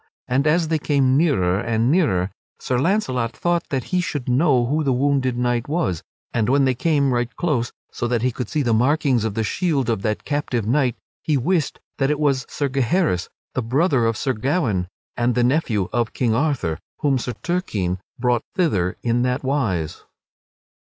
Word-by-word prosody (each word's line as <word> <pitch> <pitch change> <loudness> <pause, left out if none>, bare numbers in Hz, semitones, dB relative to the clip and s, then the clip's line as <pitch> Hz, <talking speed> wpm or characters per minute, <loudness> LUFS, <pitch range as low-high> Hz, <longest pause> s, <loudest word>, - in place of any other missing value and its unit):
And 135 +4 +1
as 160 +1 +2
they 160 -1 +1
came 140 -3 +2
nearer 100 - +2
and 115 +2 +1
nearer 100 - +2 0.3
Sir 125 -1 -1
Launcelot 130 - 0
thought 175 -1 0
that 135 -3 -1
he 180 - +3
should 145 -7 -4
know 125 -1 +3
who 150 +5 0
the 140 - +1
wounded 130 -1 +1
knight 120 -1 0
was 150 - 0 0.3
and 115 -1 +1
when 140 +1 +4
they 130 - +3
came 140 0 +1
right 120 0 0
close, 140 -9 0 0.2
so 120 - -2
that 120 -1 0
he 130 - +2
could 120 -1 -5
see 150 - 0
the 120 -3 +2
markings 130 0 +2
of 110 -3 -2
the 110 - 0
shield 140 - 0
of 110 - -1
that 105 +1 -2
captive 135 -6 -1
knight, 125 +1 +2 0.3
he 150 -3 +1
wist 155 +3 0 0.2
that 135 0 +2
it 150 0 0
was 140 -4 +1
Sir 145 - -1
Gaheris, 135 - 0 0.2
the 130 - -1
brother 130 +1 +2
of 115 -1 0
Sir 130 +1 0
Gawaine, 115 - 0 0.3
and 120 0 +1
the 125 - +3
nephew 120 - +1
of 120 -2 0
King 120 -4 +1
Arthur, 120 - 0 0.2
whom 140 -3 +2
Sir 125 +1 -4
Turquine 105 - -1 0.2
brought 125 -2 +1
thither 100 - +1
in 120 0 +1
that 125 +2 0
wise. 115 - -1
130 Hz, 185 wpm, -22 LUFS, 115-145 Hz, 0.3 s, when